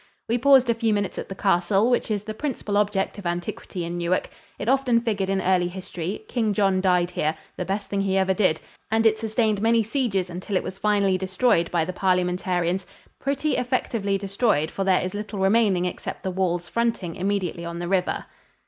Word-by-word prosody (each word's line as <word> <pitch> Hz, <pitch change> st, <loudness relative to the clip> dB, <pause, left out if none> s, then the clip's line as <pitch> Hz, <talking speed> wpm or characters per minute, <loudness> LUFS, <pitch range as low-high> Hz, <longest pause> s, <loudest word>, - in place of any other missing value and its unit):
We 235 Hz, +2 st, +1 dB
paused 265 Hz, 0 st, +6 dB
a 235 Hz, -, +3 dB
few 225 Hz, -2 st, +1 dB
minutes 205 Hz, -2 st, -2 dB
at -, -, -6 dB
the 195 Hz, -, -5 dB
castle, 195 Hz, +3 st, +2 dB
which 245 Hz, -, +1 dB
is 210 Hz, -2 st, -1 dB
the 215 Hz, 0 st, -5 dB
principal 225 Hz, -4 st, -3 dB
object 205 Hz, -1 st, 0 dB
of 190 Hz, -, -4 dB
antiquity 175 Hz, 0 st, -4 dB
in 175 Hz, +1 st, -4 dB
Newark. 175 Hz, +2 st, 0 dB, 0.3 s
It -, -, -5 dB
often 255 Hz, -2 st, +3 dB
figured 205 Hz, -5 st, -1 dB
in 195 Hz, 0 st, +1 dB
early 185 Hz, -1 st, +2 dB
history; 185 Hz, -, -5 dB
King 225 Hz, -4 st, 0 dB
John 195 Hz, -3 st, +2 dB
died 180 Hz, -2 st, +2 dB
here 155 Hz, -2 st, 0 dB, 0.2 s
the 180 Hz, -, -3 dB
best 200 Hz, +2 st, -2 dB
thing 200 Hz, -1 st, -1 dB
he 195 Hz, -1 st, +1 dB
ever 190 Hz, 0 st, +3 dB
did 185 Hz, -5 st, +2 dB, 0.3 s
and 225 Hz, +1 st, +2 dB
it 220 Hz, 0 st, +4 dB
sustained 220 Hz, -2 st, 0 dB
many 230 Hz, 0 st, +3 dB
sieges 215 Hz, -6 st, -1 dB
until 185 Hz, +3 st, -4 dB
it -, -, +1 dB
was 190 Hz, -, -7 dB
finally 200 Hz, -3 st, +2 dB
destroyed 190 Hz, -1 st, +2 dB
by 170 Hz, -2 st, +1 dB
the 185 Hz, -, -4 dB
Parliamentarians 180 Hz, -1 st, 0 dB, 0.3 s
pretty 280 Hz, +2 st, 0 dB
effectively 230 Hz, -5 st, 0 dB
destroyed, 195 Hz, -5 st, 0 dB
for 195 Hz, -, -2 dB
there 190 Hz, -1 st, +3 dB
is 185 Hz, -, -3 dB
little 210 Hz, 0 st, -5 dB
remaining 195 Hz, -2 st, +3 dB
except 180 Hz, -, -5 dB
the 190 Hz, -, -2 dB
walls 175 Hz, -2 st, -1 dB
fronting 225 Hz, -6 st, -1 dB
immediately 185 Hz, -3 st, -2 dB
on 170 Hz, 0 st, -5 dB
the 175 Hz, 0 st, -4 dB
river. 185 Hz, -1 st, 0 dB
195 Hz, 200 wpm, -24 LUFS, 180-220 Hz, 0.3 s, paused